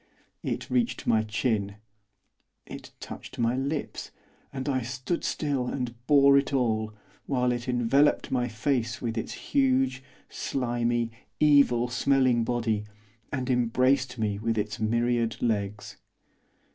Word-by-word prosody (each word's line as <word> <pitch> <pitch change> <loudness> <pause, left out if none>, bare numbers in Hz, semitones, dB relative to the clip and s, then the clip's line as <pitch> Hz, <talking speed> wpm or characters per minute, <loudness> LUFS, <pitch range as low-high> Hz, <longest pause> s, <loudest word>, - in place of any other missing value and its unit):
It - - -3
reached 245 -2 0
my 110 -2 +3
chin, 105 -2 -1 0.9
it - - -9
touched - - -9
my 115 +1 +1
lips, 140 +3 -3 0.4
and 130 0 -5
I 130 -2 +1
stood 130 +7 -3
still 140 -5 -1
and 125 -3 -3
bore 140 -1 +6
it 140 - -3
all, 110 -5 0 0.3
while 125 -2 +1
it 120 +1 -3
enveloped 125 +4 +2
my 125 -2 +1
face 120 +1 -1
with 115 -2 -3
its 115 - -3 0.2
huge, 130 -1 +2 0.3
slimy, 120 -2 -1 0.3
evil 140 -5 +5
smelling 125 -1 +2
body, 115 -3 -1 0.5
and 130 -2 -2
embraced 125 +1 +2
me 105 -3 -1
with 115 +1 -1
its 120 +4 -2
myriad 115 0 0
legs. 105 -2 -2
125 Hz, 125 wpm, -27 LUFS, 115-135 Hz, 0.9 s, bore